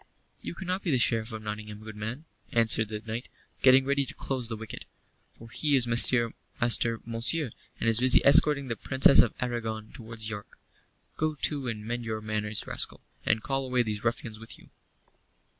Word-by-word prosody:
"You - - -7
cannot 185 +1 -3
be 185 - -3
the 135 - +2
Sheriff 115 -1 +1
of 110 -1 -7
Nottingham, 105 0 -7
good 110 -1 -9
man," 110 +9 -6 0.3
answered 110 -1 +2
the 105 -1 -5
knight, 115 +3 -6 0.3
getting 130 0 +5
ready 140 0 +1
to - - -8
close 130 -4 -3
the 110 - -4
wicket, 110 0 -9 0.5
"for 115 - -15
he 150 +1 +1
is 130 -3 +3
Master 120 0 +4 0.3
Monceux, 120 +4 +1 0.3
and - - -2
is 115 0 +3
busy 130 0 +7
escorting 145 -1 +6
the 115 - -3
Princess 130 +5 +4
of - - +4
Aragon 115 -3 -4
towards 115 -2 -8
York. 105 -1 -8 0.6
Go 155 0 -1
to 140 -4 0
and 105 -3 -5
mend 120 +1 -4
your 110 -1 -4
manners, 105 -1 -3
rascal, - - -1 0.2
and 110 0 +1
call 135 0 -1
away 125 -1 0
these 105 -2 -4
ruffians 115 -2 -3
with 115 0 -8
you." - - -20
115 Hz, 180 wpm, -27 LUFS, 110-130 Hz, 0.6 s, busy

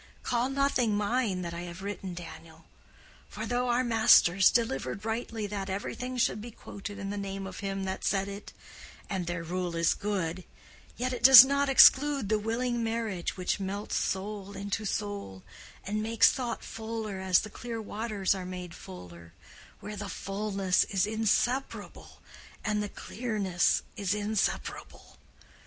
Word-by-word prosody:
Call 245 +1 0
nothing 270 -6 +1
mine 205 -3 0
that 170 -1 -5
I 170 - -5
have 175 +1 -8
written, 195 -3 -5
Daniel; 165 -1 -11 0.6
for - - -6
though 245 0 -1
our 240 +1 +2
masters 220 -6 +6
delivered 200 - -1
rightly 225 -1 -3
that 200 -1 -4
everything 250 +6 -4
should 225 -3 +1
be 240 - -7
quoted 205 -2 -9
in 200 -1 -5
the 205 - -4
name 195 0 -5
of 190 -1 -8
him 195 -1 -3
that 190 0 -4
said 195 0 +1
it—and 195 -2 -8
their 175 -1 -3
rule 175 0 -3
is 165 0 +3
good—yet 200 +6 -5
it 250 - -5
does 265 -1 +12
not 280 +1 +1
exclude 270 -3 +6
the 215 -1 +2
willing 235 +2 -1
marriage 225 -7 -2
which 180 +2 -1
melts 200 +2 -4
soul 200 +1 -3
into 200 +2 -3
soul, 200 - -4 0.4
and 210 +2 -2
makes 225 0 +4
thought 245 -5 -4
fuller 220 -3 -5
as 190 -1 +3
the 215 - -8
clear 230 0 -6
waters 210 -2 -1
are 190 -1 -5
made 180 -1 -7
fuller, 85 - -11 0.5
where 210 - -7
the 205 -1 -6
fullness 195 -2 0
is 195 -2 0
inseparable 225 +5 -2 0.4
and 210 -1 0
the 205 - -3
clearness 205 -8 -1
is 200 0 -1
inseparable. 210 0 -3
205 Hz, 150 wpm, -29 LUFS, 190-225 Hz, 0.6 s, does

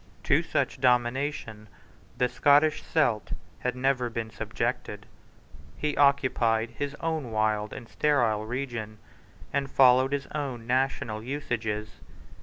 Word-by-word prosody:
To - - +3
such - - -2
domination 125 -3 0 0.5
the 125 - +2
Scottish 145 +5 +3
Celt 120 -10 0 0.3
had 125 0 -2
never 125 -1 +1
been 115 -1 -4
subjected. 105 - -3 0.7
He 150 -1 -1
occupied 125 -5 +2
his 145 +4 -4
own 160 -6 -2
wild 110 -1 0
and 115 - -8
sterile 115 -9 +1
region, 120 -4 -4 0.6
and 140 0 0
followed 130 0 +5
his 140 -1 -1
own 135 -6 -4
national 125 -3 0
usages. 110 -5 -4
125 Hz, 115 wpm, -27 LUFS, 110-140 Hz, 0.7 s, followed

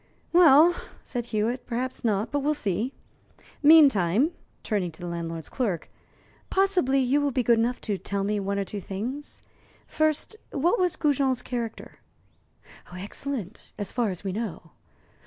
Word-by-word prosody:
"Well," 335 -1 +7 0.3
said 240 -2 -4
Hewitt, 235 +3 -1
"perhaps 250 +2 -3
not; 215 -1 0
but 290 - +1
we'll 295 +2 +1
see. 215 0 -1 0.7
Meantime" 280 - +6 0.3
turning 195 -5 -1
to 160 - -16
the 175 - -6
landlord's 165 -1 -5
clerk 200 - -2 0.6
"possibly 370 -9 +2
you 265 +3 +2
will 285 - +1
be 255 -2 0
good 235 -1 +4
enough 240 +2 0
to 205 -4 -2
tell 200 0 -2
me 210 +1 0
one 200 0 -2
or 200 - -1
two 205 +1 -6
things. 240 +11 -5 0.4
First, 310 +6 0 0.2
what 340 - +1
was 360 -2 +1
Goujon's 270 -4 +1
character?" 235 -3 -5 0.9
"Excellent, 205 +3 -6
as 205 - -4
far 240 -4 0
as 185 0 -6
we 195 - -2
know. 190 -6 -5
240 Hz, 150 wpm, -26 LUFS, 200-280 Hz, 0.9 s, Well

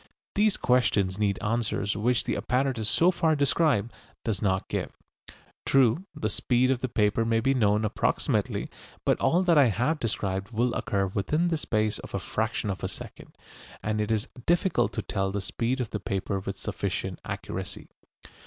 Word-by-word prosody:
These 210 0 +3
questions 100 -6 +2
need 100 -2 +1
answers 105 -2 0
which 120 +3 +1
the - - -1
apparatus 125 -3 0
so 175 +2 +5
far 160 -3 +2
described 140 -6 +2 0.3
does 110 -5 -1
not 95 -2 0
give. - - -4 0.7
True, 135 - +3
the 110 - -1
speed 125 +4 +2
of 130 - +1
the 130 - -2
paper 105 0 +2
may 115 0 +2
be 135 +4 +2
known 105 -3 +2
approximately, 105 - 0 0.4
but - - +2
all 175 +3 +3
that 170 -4 +5
I 140 - +6
have 125 - 0
described 100 -4 -2
will 120 +1 0
occur 100 -1 0
within 150 - 0
the 165 - +1
space 110 -7 0
of - - -8
a - - 0
fraction 110 -1 -2
of 95 - -6
a - - +1
second, - - -10 0.5
and 105 0 0
it 105 - -2
is 110 -1 0 0.2
difficult 175 - +2
to - - -3
tell 95 -1 -1
the 100 - -2
speed 115 +6 -2
of 125 -4 -3
the 105 - -2
paper 95 0 -2
with 95 - -5
sufficient - - -3
accuracy. - - -5
115 Hz, 175 wpm, -27 LUFS, 105-130 Hz, 0.7 s, I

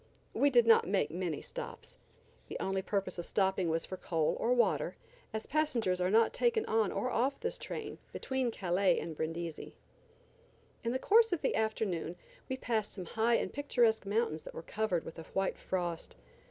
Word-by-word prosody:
We 285 - +4
did 240 -3 +5
not 225 -5 +6
make 190 -6 +1
many 170 -3 -3
stops. - - -8 0.5
The - - -5
only 190 0 -1
purpose 195 -2 -2
of 170 - -4
stopping 190 -3 +1
was 165 0 0
for 185 - -6
coal 160 -4 0
or 235 - +1
water, 245 -1 +2 0.4
as 220 - -4
passengers 235 -12 +1
are 180 - +2
not 225 +3 +4
taken 470 -3 +2
on 220 -3 +2
or 255 - -1
off 265 +4 +1
this 485 +1 -3
train - - -6
between 265 -2 -1
Calais 190 -3 +2
and 160 -1 -5
Brindisi. 165 +1 -4 1.1
In 230 - 0
the 255 - +1
course 450 - +5
of 350 - -1
the - - +1
afternoon 195 -6 -1 0.3
we 260 - -2
passed 225 -5 -1
some 185 -3 -6
high 230 +6 +2
and - - -1
picturesque 240 -7 +2
mountains 205 -7 0
that - - -10
were 165 - -6
covered 205 -5 -1
with 165 - -9
a - - -6
white 195 0 0
frost. 175 -3 -3
215 Hz, 180 wpm, -33 LUFS, 180-245 Hz, 1.1 s, not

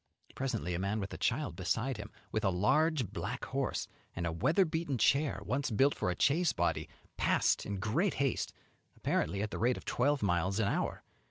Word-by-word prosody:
Presently 115 -9 -2
a 85 - -1
man 100 +3 -1
with 100 -1 -4
a - - -5
child 145 +5 0
beside 110 +7 -1
him, 105 0 -7 0.2
with 110 - -1
a 95 - +4
large 130 - +2
black - - -4
horse, - - -2 0.3
and 85 - -2
a 85 - 0
weather 155 - +3
beaten 160 -4 -1
chair, 140 +5 +3
once 140 +2 0
built 135 +6 +3
for - - -1
a 90 - 0
chaise 160 +4 +3
body, - - 0 0.3
passed - - +2
in 100 - -2
great 145 - +1
haste, 135 -2 0 0.5
apparently 100 +1 0
at 105 - -3
the - - -4
rate 120 +2 +2
of - - -10
twelve 140 0 +1
miles 90 +1 +1
an 110 - +2
hour. - - -1
115 Hz, 195 wpm, -33 LUFS, 100-145 Hz, 0.5 s, a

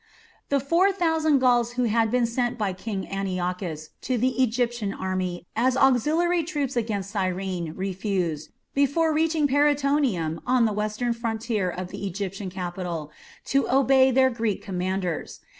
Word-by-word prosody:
The 280 - +2
four 335 +9 +3
thousand 320 -5 +2
Gauls 245 -2 +3
who 250 0 0
had 225 -1 +2
been 245 +1 +2
sent 240 +1 -1
by 205 -4 -1
King 190 +1 -5
Antiochus 180 -4 -3
to 255 - -1
the 255 +2 +1
Egyptian 240 -3 0
army 185 -2 -3
as 255 +3 +2
auxiliary 315 +7 +3
troops 290 -5 -2
against 210 -4 -2
Cyrene 185 -4 -2
refused, 185 -5 -2 0.2
before 285 +4 +2
reaching 315 -1 +2
Paraetonium, 280 - +1
on 250 -2 +3
the 215 - +1
western 215 +3 -1
frontier 225 -4 -2
of 180 +1 -5
the 200 - -5
Egyptian 195 +1 -4
kingdom, 175 -4 -5 0.4
to 275 +1 +1
obey 265 0 +5
their 260 0 +4
Greek 225 -4 -2
commanders. 185 -2 -3
230 Hz, 140 wpm, -25 LUFS, 190-265 Hz, 0.4 s, obey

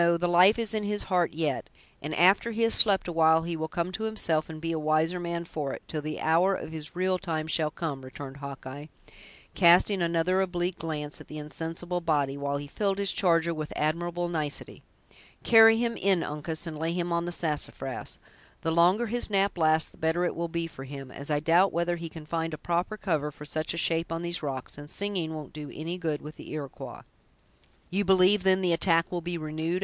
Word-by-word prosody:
the 175 - +1
life 180 +5 +6
is 230 -2 -3
in 215 - 0
his 205 0 -2
heart 180 -2 +1
yet, 155 -4 -2 0.3
and 150 +1 -4
after 190 +7 +5
he 230 0 -1
has 230 - +4
slept 200 -4 +4
awhile 160 -1 +4
he 170 0 -3
will 160 0 -3
come 170 +2 -2
to 220 +4 -3
himself, 165 -8 0
and 160 -1 -7
be 165 +1 -3
a 160 - -1
wiser 155 +3 +1
man 170 0 -3
for 150 -4 -4
it, - - -8
till 155 - -3
the 155 +1 -5
hour 175 +5 +3
of 160 - -6
his 155 0 -7
real 185 0 +1
time 160 -4 -3
shall 160 -1 +1
come," 150 -4 -4
returned 135 +1 -8
Hawkeye, 140 +1 -8 0.7
casting 180 +3 +5
another 170 +2 +2
oblique 175 -1 -2
glance 150 -2 -4
at - - -13
the 155 - -8
insensible 165 +4 -4
body, 145 -5 +1
while 140 0 -2
he 145 - -6
filled 195 +6 -1
his 200 -1 0
charger 170 -2 +2
with 155 -1 -5
admirable 175 +3 -1
nicety. 155 -4 -4 0.6
"Carry 225 -1 +7
him 235 0 0
in, 190 -5 +2
Uncas, 155 +3 -3
and 155 -2 -6
lay 165 +1 -1
him 175 0 -2
on 170 0 0
the 175 - -3
sassafras. 155 -4 -2 0.5
The 165 - 0
longer 180 +8 +4
his 240 +1 -1
nap 200 -1 +1
lasts 160 -2 +2
the - - -20
better 160 +2 +1
it - - -2
will 170 +1 -2
be 170 0 -2
for 135 -5 -9
him, 135 -1 -8
as 140 +3 -6
I 150 -1 +2
doubt 170 +5 +4
whether 170 +1 0
he 165 -1 -6
can 160 -1 -10
find 165 0 -2
a - - -12
proper 175 +6 -1
cover 160 -7 -1
for 150 0 -11
such 155 +2 -2
a - - -5
shape 165 0 0
on 165 +1 -3
these 170 0 -2
rocks; 135 -1 -4
and 145 0 -10
singing 185 -5 -1
won't 150 -3 -8
do 150 -1 -7
any 170 +4 -5
good 155 -4 -2
with 155 +1 -9
the - - -10
Iroquois." 145 -4 -7 0.9
"You 195 +3 +1
believe, 190 +1 +5
then, 190 0 +3
the 180 -2 +2
attack 165 -1 +3
will 175 -1 -2
be 175 +1 -3
renewed?" 160 +3 -2
165 Hz, 215 wpm, -28 LUFS, 155-180 Hz, 0.9 s, Carry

